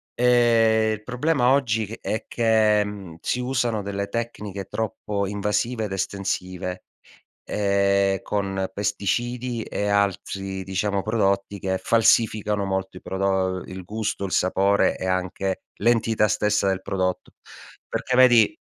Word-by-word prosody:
ehm, 115 -3 +4
il 105 0 -7
problema 125 +2 +1
oggi 115 -5 +2 0.2
è 110 - -2
che, 110 -2 +3
mhmm, 100 -5 -8
si 125 - -1
usano 120 -4 0
delle 100 0 -3
tecniche 105 -4 -4
troppo 105 -2 -3
invasive 105 +3 -1
ed 105 - -6
estensive, 95 -1 -3 0.7
ehm, 100 -1 +2
con 95 -2 -2
pesticidi 115 +4 -2
e 105 - -3
altri 95 -1 -1
diciamo 95 +1 -1
prodotti 100 -2 0
che 95 0 -1
falsificano 110 -3 +2
molto 95 -1 -3
i - - -23
prodo 95 -1 -1
il 95 -1 -8
gusto, 105 0 -3
il 95 - -4
sapore 100 +2 +2
e 95 - -4
anche 95 +1 -2 0.2
l'entità 115 -1 +2
stessa 105 -1 +1
del 95 0 -1
prodotto. 95 -2 -2 0.6
Perché 125 - -1
vedi 120 -4 +6
100 Hz, 125 wpm, -24 LUFS, 95-110 Hz, 0.7 s, vedi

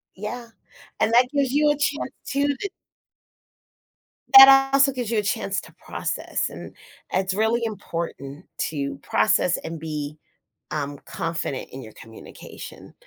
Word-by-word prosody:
Yeah, 235 +5 -6 0.5
and - - +2
that 250 +1 +5
gives 280 -3 +1
you 295 +1 +3
a - - +3
chance 285 -1 -1 0.2
too, 280 +1 +1
that 285 +8 -2 1.7
that 270 0 +10
also 275 0 +5
gives 245 -4 -4
you 225 - +1
a 210 - -1
chance 195 -1 -1
to - - -15
process, - - -3
and - - -10 0.4
it's 190 0 0
really 220 +4 +1
important 170 -7 -6 0.2
to 140 -3 -4
process 180 -4 +2
and 165 - -7
be, 150 -1 -5 0.6
um, 145 -1 -3
confident 140 0 -4
in 135 - -7
your 110 - -11
communication. 110 0 -12
210 Hz, 140 wpm, -23 LUFS, -, 1.7 s, that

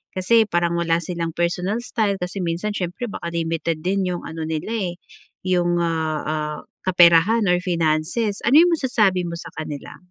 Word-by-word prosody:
kasi 220 +5 +4
parang 175 -2 0
wala 170 -1 +1
silang 170 -1 -3
personal 180 +6 -1
style 215 -5 -1
kasi 180 +1 -4
minsan, 175 +5 -2
siyempre 180 +6 -3
baka 170 -5 -6
limited 165 -1 -2
din 190 +4 0
yung 180 -1 -3
ano 160 0 -5
nila, 160 +6 -3 0.2
eh, - - -10 0.5
yung, 175 -2 +1
ah, 160 -2 -1
ah, 150 -1 -3 0.3
kaperahan 175 +5 +5
or 180 - +4
finances, 170 +5 0
ano 250 - +5
yung 350 - +3
masasabi 210 - +1
mo 170 - -5
sa 170 - -8
kanila? 150 -2 -7
175 Hz, 165 wpm, -22 LUFS, 165-195 Hz, 0.5 s, kaperahan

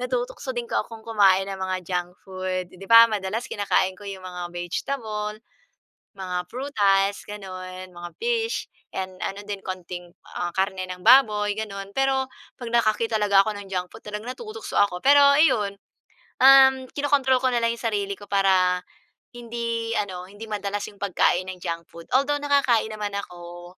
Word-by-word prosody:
natutukso 250 +1 -3
din 240 - -2
ko - - +2
akong 225 0 -11
kumain 195 -4 +4
ng 195 - -5
mga 185 0 -2
junk 180 0 -3
food. 185 -1 -3
Eh, 185 - -15
di 195 - -10
ba 230 0 +9
madalas 210 +2 -2
kinakain 190 -2 +1
ko 205 - -12
yung 195 -1 -7
mga 180 -1 -6
vegetable, 210 +4 -3 0.8
mga 185 -2 -4
prutas 200 -7 +1
gano'n, 185 -2 -8
mga 175 0 -8
fish, 460 0 -1 0.3
and 185 -1 -4
ano 200 +1 -4
din 205 -1 -5
konting, 180 -1 -6 0.3
ah, 175 - 0
karne 190 -1 -1
ng 180 0 -7
baboy, 210 -6 +5
gano'n. 200 -2 -6
Pero 270 0 +2 0.3
'pag 240 -2 -6
nakakita 225 -1 +2
talaga 200 -1 +5
ako 215 - 0
ng 200 - -9
junk 180 -1 -2
food, - - -12
talagang 210 +4 -5
natutukso 440 - -5
ako. 180 -3 +2
Pero 285 +1 +7 0.2
ayon, 220 -10 +3 0.6
um, 265 0 +7
kinokontrol 275 -3 +2
ko - - +5
na 240 - +2
lang 230 0 +2
yung - - -13
sarili 200 -1 -1
ko 205 - -12
para 190 -2 +3 0.5
hindi 235 -1 -3
ano, 185 -3 -3
hindi 205 +3 -9
madalas 205 -1 -3
yung 205 - -18
pagkain 185 -2 +2
ng 185 -1 -8
junk 170 0 -4
food. 170 0 -12
Although, 290 +2 0
nakakain 275 -6 +2
naman 210 -1 -4
ako, 175 -2 -8
205 Hz, 170 wpm, -24 LUFS, 185-235 Hz, 0.8 s, ba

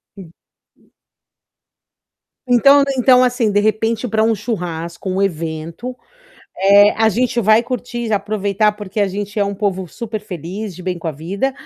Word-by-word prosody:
Hum. 185 -5 -12 2.1
Então 275 +3 +5
então, 250 0 +5
assim, 245 -3 +1
de 205 - +2
repente, 220 +3 0
para 220 0 +1
um 225 0 +2
churrasco, 175 -5 -5
um 190 +1 -1
evento, 165 +6 -4 1.0
a 220 0 +3
gente 240 +3 0
vai 215 +1 +4
curtir, 240 -2 -4
aproveitar, 205 0 0
porque 210 0 -5
a 200 - +2
gente 205 +2 -5
é 205 - +3
um 200 0 -3
povo 190 -2 -2
super 220 +2 -6
feliz, 190 +1 -7
de 180 - -10
bem 180 -1 -3
com 165 - -4
a - - -3
vida. 190 - -3
210 Hz, 150 wpm, -18 LUFS, 185-230 Hz, 2.1 s, Então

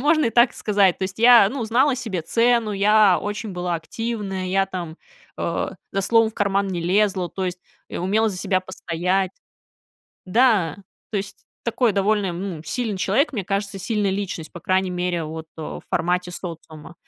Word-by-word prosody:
можно 310 +2 +3
и 230 - 0
так 235 +2 +4
сказать, 200 -4 +2
то - - -6
есть, 190 +2 -3
я, 235 -3 +7
ну, 250 +1 -4
знала 250 +5 +2
себе 200 -9 -3
цену, 230 +3 +2
я 205 -1 +4
очень 210 +1 -4
была 180 -1 -2
активная, 195 +1 -4
я 195 +1 +2
там, 175 -4 -6 0.4
э, - - -1 0.3
за 195 - 0
словом 225 +2 +3
в - - -24
карман 200 -1 +1
не 175 -2 -3
лезла, 190 0 +1
то 190 - -4
есть, 180 0 -3 0.3
и - - -6
умела 210 +5 +1
за 195 - -4
себя 185 -1 +1
постоять. 185 +1 -1 0.9
Да, 195 - +3 0.3
то 215 - -2
есть, 200 +1 -6 0.3
такой 235 -1 +1
довольно, 200 -1 +1
ну, 175 -3 -5
сильный 225 -2 -2
человек, 215 - +1
мне 210 -7 -3
кажется, 195 0 -2
сильная 205 +1 0
личность, 190 -5 -4
по 175 - -9
крайней 185 +2 +1
мере, 180 -2 -1
вот, 160 +1 -7
в 160 - -6
формате 180 +1 0
социума. 165 -3 -8
195 Hz, 175 wpm, -22 LUFS, 180-220 Hz, 0.9 s, я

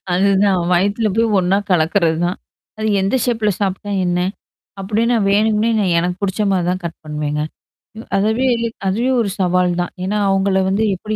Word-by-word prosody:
அதுதான் 195 +1 +3
வயித்துல 200 +5 +1
போய் 230 0 +3
ஒன்னா 185 +2 +2
கலக்குறதுதான். 170 +1 +1 0.4
அது 215 - -2
எந்த 195 +6 0
ஷேப்ல 225 -4 +1
சாப்ட்டா 195 +1 -2 0.2
என்ன? 175 0 0 0.6
அப்பிடின்னா 220 +5 0
வேணுக்கும்னே 215 +2 +2
நான் 190 -4 +1
எனக்குப் 180 +2 -3
பிடிச்சமாரி 195 -2 0
தான் 185 +1 -2
கட் 170 -1 -5
பண்ணுவேங்க. 150 0 -3 0.6
இவ் 225 - -9
அதுவே 220 +6 +1 0.4
அதுவே 230 +7 0
ஒரு 210 - -1
சவால் 180 -1 +2
தான். 175 - -4
ஏன்னா 205 +3 -1
அவுங்கள 195 0 +2
வந்து 200 +3 +1
எப்பிடி 215 +4 -5
195 Hz, 150 wpm, -18 LUFS, 180-215 Hz, 0.6 s, அதுதான்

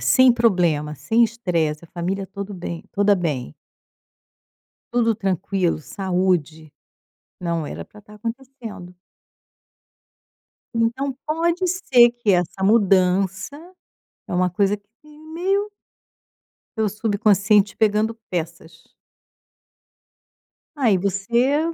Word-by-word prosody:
sem 255 -1 +5
problema, 175 -10 +1
sem 225 +10 +1
estresse, 170 -9 -1
a - - -16
família 190 +3 -3
tudo 200 +1 -7
bem 170 -1 -6
toda 205 0 +3
bem 145 - -3 1.4
tudo 230 -2 +2
tranquilo, 190 -2 -1
saúde. 175 -4 -1 0.7
Não 170 -3 -2
era - - -7
para 210 - -16
estar 210 +1 -16
acontecendo. 230 -5 -8 1.8
Então 235 +4 0
pode 335 +4 0
ser 255 -10 +5
que 240 -3 -1
essa 180 +2 0
mudança 190 +1 +2 0.7
é - - -6
uma 180 0 +2
coisa 200 +3 +1
que 230 +9 -21 0.2
meio 390 +4 0 1.1
seu 220 -1 +1
subconsciente 205 -1 +2
pegando 215 +1 +2 0.2
peças. 165 -1 -6 1.8
Aí 235 -9 +3
você 235 - +1
200 Hz, 95 wpm, -22 LUFS, 180-235 Hz, 1.8 s, sem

